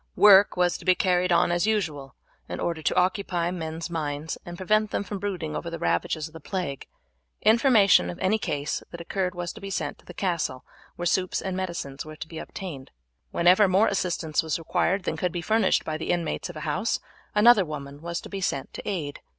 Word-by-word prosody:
Work 205 -2 +7
was 180 -1 +2
to - - -12
be 185 -1 +5
carried 180 -1 +2
on 175 0 +4
as 175 +4 +1
usual 155 - -1 0.3
in - - -4
order 165 -2 -2
to - - 0
occupy 180 -2 +1
men's 165 -2 -4
minds 155 -2 -3
and 175 0 -7
prevent 215 +3 +2
them - - -1
from 200 -1 -5
brooding 180 -6 -3
over 170 - -4
the 165 - -5
ravages 85 - 0
of 155 - -17
the 160 - -9
plague. 175 -4 -4 0.6
Information 220 -3 +5
of 175 - -6
any 195 +4 +1
case 145 -6 -2
that 170 - -9
occurred 180 +1 -2
was 175 -1 -4
to 220 - -12
be 195 - -6
sent 195 - -3
to - - -22
the - - -11
castle, 170 -9 -2 0.3
where 175 - -4
soups 185 +1 +1
and 190 -1 -3
medicines 170 -7 -4
were 155 0 -10
to 155 - -8
be 160 0 -7
obtained. 160 -10 -7 0.4
Whenever 180 - +5
more 190 +4 +4
assistance 170 -5 0
was 160 -1 -1
required 180 +3 0
than - - -2
could 180 - 0
be 175 - -3
furnished 215 +2 +2
by 155 0 -2
the 160 - -5
inmates 175 0 -1
of 175 - -8
a - - -6
house 175 +9 -1 0.4
another 215 0 +7
woman 145 -3 -7
was 170 +1 -3
to - - -9
be 195 -1 -5
sent 140 -7 -2
to - - -6
aid. 155 -8 -3
175 Hz, 215 wpm, -26 LUFS, 160-195 Hz, 0.6 s, Work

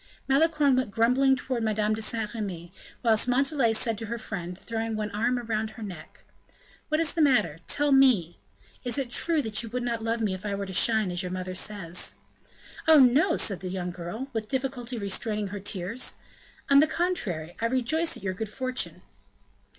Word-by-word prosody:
Malicorne 290 0 +3
went 255 -3 0
grumbling 250 +5 +3
towards 255 -2 -3
Madame 215 -1 +1
de 220 - -3
Saint 220 -1 -1
Remy, 185 -6 -5 0.3
whilst 225 0 +3
Montalais 265 -2 +2
said 225 -1 -1
to 225 - -6
her 235 +2 -3
friend, 180 -5 -6
throwing 225 +1 -3
one 210 -1 -3
arm 235 +4 0
around 220 -2 -2
her 220 +1 -10
neck: 175 -6 -10 0.7
"What 310 0 +1
is 330 -1 +2
the 335 - 0
matter? 255 - +3
Tell 290 0 +2
me. 245 -12 +4 0.4
Is 245 +2 -1
it 265 -4 -2
true 325 0 +3
that 220 -1 +1
you 230 - -6
would 250 +2 -3
not 235 -2 -2
love 230 +1 -1
me 210 -4 0
if 185 0 -7
I 205 -1 -2
were 200 0 -3
to 190 - -7
shine, 220 -2 +4
as 175 0 +1
your 180 - -4
mother 185 0 -4
says?" 185 -2 -2 0.7
"Oh, 320 -1 +8
no!" 265 +2 +5
said 195 -4 0
the 185 - -5
young 180 -1 -3
girl, 180 +10 -6
with 220 -2 -3
difficulty 255 -2 -3
restraining 210 0 -2
her 205 +1 -5
tears; 200 +4 -2 0.5
"on 280 0 +6
the 310 - +5
contrary, 240 - -2
I - - +1
rejoice 260 +7 0
at - - -14
your 190 -1 -1
good 215 +3 -5
fortune." 255 +3 -2
225 Hz, 195 wpm, -27 LUFS, 200-260 Hz, 0.7 s, Oh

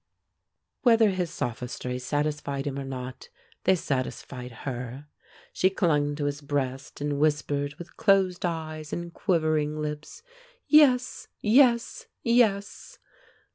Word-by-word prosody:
Whether 225 -4 +5
his 180 -2 -2
sophistries 125 +1 -4
satisfied 145 -1 -2
him 140 -1 -3
or - - -4
not, 130 -1 -7 0.4
they 190 - +5
satisfied 130 -4 -4
her. 125 +1 -5 0.5
She 185 - +3
clung 150 -7 +1
to 145 -1 -2
his 145 0 -2
breast, 135 -1 -3
and 145 -1 -1
whispered, 145 -1 0
with 175 +2 -12
closed 190 -3 +3
eyes 155 -3 -4
and 170 0 -5
quivering 155 -4 0
lips, 150 - -5 0.4
"Yes, 265 -5 +4
yes, 235 +1 +3 0.2
yes!" 220 -4 +1
150 Hz, 115 wpm, -27 LUFS, 140-185 Hz, 0.5 s, Whether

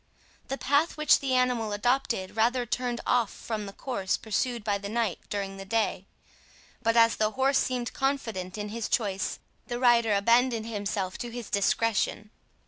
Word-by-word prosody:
The 270 - -3
path 290 +5 +1
which 305 -1 +5
the 265 -2 0
animal 245 -4 +1
adopted 230 -3 0
rather 240 +3 +2
turned 245 0 -2
off 240 -4 +2
from 215 -3 -5
the - - -6
course 195 -3 -2
pursued 230 +2 -2
by 205 -1 0
the 200 0 -6
knight 225 -4 -1
during 195 -1 -3
the 195 - -7
day; 200 -2 -1 0.7
but 230 +1 +2
as 230 0 +5
the 215 0 +2
horse 265 +4 +2
seemed 250 -2 -2
confident 225 -9 -2
in 210 0 -4
his 225 +1 -4
choice, 200 -4 -1 0.3
the 240 - -3
rider 235 -3 +4
abandoned 230 +2 +3
himself 200 -4 -3
to 240 - -4
his 235 -1 -7
discretion. 210 +1 +1
230 Hz, 165 wpm, -28 LUFS, 205-245 Hz, 0.7 s, which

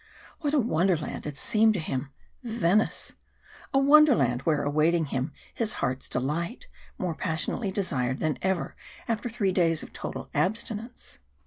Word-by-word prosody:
What 295 -2 0
a - - +5
wonderland 175 - 0
it 145 -2 -6
seemed 220 +6 +3
to - - 0
him, 135 -3 -3 0.3
Venice! 220 -4 +1 0.6
A 270 - +2
wonderland 275 - +5
where 155 0 +2
was - - -3
awaiting 155 +3 +2
him 135 0 -2 0.2
his 220 -2 0
heart's 130 +1 -2
delight 160 - -2 0.3
more 180 -3 -2
passionately 170 +6 -1
desired 140 -10 -1
than 155 0 -1
ever 190 -2 -1 0.3
after 230 +1 -1
three 215 -5 0
days 165 -3 +2
of - - -11
total - - -5
abstinence. 220 - -2
180 Hz, 145 wpm, -27 LUFS, 150-220 Hz, 0.6 s, a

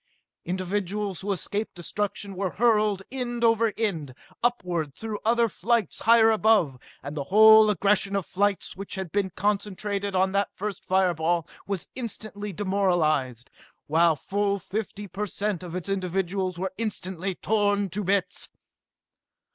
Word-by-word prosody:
Individuals 190 +1 -2
who 200 +1 -2
escaped 205 +3 -3
destruction 200 +3 -3
were 190 0 -1
hurled 210 -3 +3
end 240 -2 -3
over 230 -1 +4
end, 160 - -2 0.3
upward 180 - -1
through 220 -2 -5
other 235 +1 +3
flights 225 +1 0
higher 225 0 +6
above, 210 - +3 0.2
and 140 +2 -6
the 140 -2 -3
whole 220 +4 +8
aggregation 200 0 +2
of 195 -4 -1
flights 200 +1 -1
which 195 +1 -7
had 190 -4 -5
been 200 -2 0
concentrated 200 0 -2
on 190 +1 +3
that 200 0 +1
first 205 -1 -4
fire 185 -1 +2
ball 165 0 0 0.2
was 195 -3 -3
instantly 215 -4 -5
demoralized, 165 - 0 0.3
while 165 +1 +3
full 200 +6 -1
fifty 205 +1 -5
per 210 +3 -4
cent 200 -1 -2
of 175 -1 -7
its 180 0 -5
individuals 190 -1 -1
were 190 +1 -3
instantly 190 -4 -3
torn 205 0 +1
to 200 +4 -4
bits! 195 +1 0
200 Hz, 140 wpm, -26 LUFS, 180-210 Hz, 0.3 s, whole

